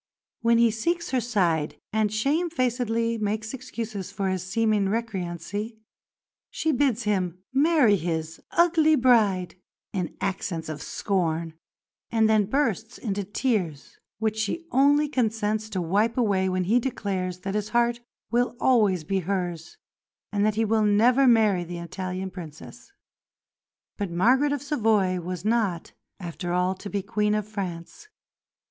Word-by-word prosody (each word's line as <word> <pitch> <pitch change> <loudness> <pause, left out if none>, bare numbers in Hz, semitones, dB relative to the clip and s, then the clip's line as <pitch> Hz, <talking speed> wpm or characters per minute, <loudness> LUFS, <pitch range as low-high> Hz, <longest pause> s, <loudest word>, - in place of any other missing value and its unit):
When 230 0 +4
he 235 -1 +4
seeks 335 +10 -2
her 255 -2 +1
side 175 -10 0
and 215 -1 +1
shamefacedly 245 -4 0
makes 215 +2 -2
excuses 225 -6 -6
for 195 -1 -2
his 185 -1 -1
seeming 215 +1 +1
recreancy, 205 0 -3 0.7
she 320 - -1
bids 255 -4 +1
him 185 -4 -1
marry 280 -6 +4
his 160 -2 -3
"ugly 325 -2 +4
bride" 215 -8 +3 0.4
in 180 -4 -3
accents 175 -4 -3
of 150 -2 -5
scorn, 165 -4 -1 0.6
and 225 -1 +3
then 215 -2 +3
bursts 225 -2 -1
into 205 -3 -3
tears, 195 - -2 0.2
which 220 0 -1
she 220 +11 -2
only 285 +3 +4
consents 220 -5 -1
to 190 -4 -2
wipe 210 +8 +1
away 195 -6 +2
when 185 0 0
he 220 +7 +3
declares 190 -7 -3
that 195 +1 -4
his 210 0 -2
heart 235 +1 +2 0.3
will 245 +1 +1
always 210 -9 +3
be 190 +5 -1
hers 180 - -3 0.5
and 205 -1 0
that 215 - 0
he 225 +1 +1
will 220 +1 +2
never 235 +6 +4
marry 215 -6 +4
the 175 0 -7
Italian 185 +2 -5
Princess. 165 - -11 1.1
But 200 -3 -2
Margaret 250 +12 +3
of 285 -1 -2
Savoy 215 -10 +1
was 180 +1 -5
not 215 -7 0 0.3
after 175 0 -5
all 180 +1 +1
to 190 +2 -9
be 200 -1 -2
Queen 210 +1 0
of 210 -1 -2
France. 190 - -6
210 Hz, 140 wpm, -25 LUFS, 185-235 Hz, 1.1 s, When